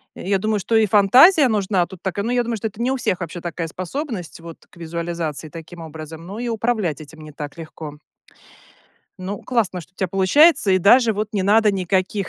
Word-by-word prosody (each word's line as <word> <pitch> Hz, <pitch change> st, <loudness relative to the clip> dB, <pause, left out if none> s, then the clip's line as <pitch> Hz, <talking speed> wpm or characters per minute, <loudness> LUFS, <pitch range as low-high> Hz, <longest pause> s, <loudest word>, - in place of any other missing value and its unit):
я -, -, -9 dB
я -, -, +4 dB
думаю, 215 Hz, +1 st, -1 dB
что 225 Hz, -, -1 dB
и 220 Hz, -1 st, +5 dB
фантазия 250 Hz, -, +6 dB
нужна 195 Hz, -5 st, +1 dB
тут 190 Hz, -3 st, -13 dB
такая, 200 Hz, +2 st, -3 dB
но 240 Hz, -, -1 dB
я 245 Hz, -1 st, +1 dB
думаю, 230 Hz, -1 st, -3 dB
что 220 Hz, -, -3 dB
это 215 Hz, +2 st, -9 dB
не 250 Hz, -, +1 dB
у 265 Hz, -, -1 dB
всех 185 Hz, -6 st, -1 dB
вообще 170 Hz, +1 st, -5 dB
такая 170 Hz, -1 st, -4 dB
способность 185 Hz, -, -6 dB
вот, 165 Hz, -1 st, -10 dB
к -, -, -21 dB
визуализации 165 Hz, -2 st, -5 dB
таким 165 Hz, +2 st, -11 dB
образом, 160 Hz, +1 st, -9 dB
ну 200 Hz, +5 st, -7 dB
и 240 Hz, 0 st, -3 dB
управлять 220 Hz, -, -1 dB
этим 155 Hz, +1 st, -13 dB
не 155 Hz, 0 st, -11 dB
так 145 Hz, +2 st, -8 dB
легко. 155 Hz, -2 st, -9 dB, 1.2 s
Ну 195 Hz, +2 st, -5 dB
классно, 220 Hz, -7 st, -1 dB
что 180 Hz, -, -18 dB
у -, -, -54 dB
тя 190 Hz, -, -2 dB
получается, 195 Hz, -, +4 dB
и 185 Hz, -, +4 dB
даже 225 Hz, +5 st, +5 dB
вот 210 Hz, +1 st, -3 dB
не 205 Hz, -, -1 dB
надо 210 Hz, +1 st, +4 dB
никаких 190 Hz, +1 st, -1 dB
190 Hz, 215 wpm, -21 LUFS, 170-220 Hz, 1.2 s, фантазия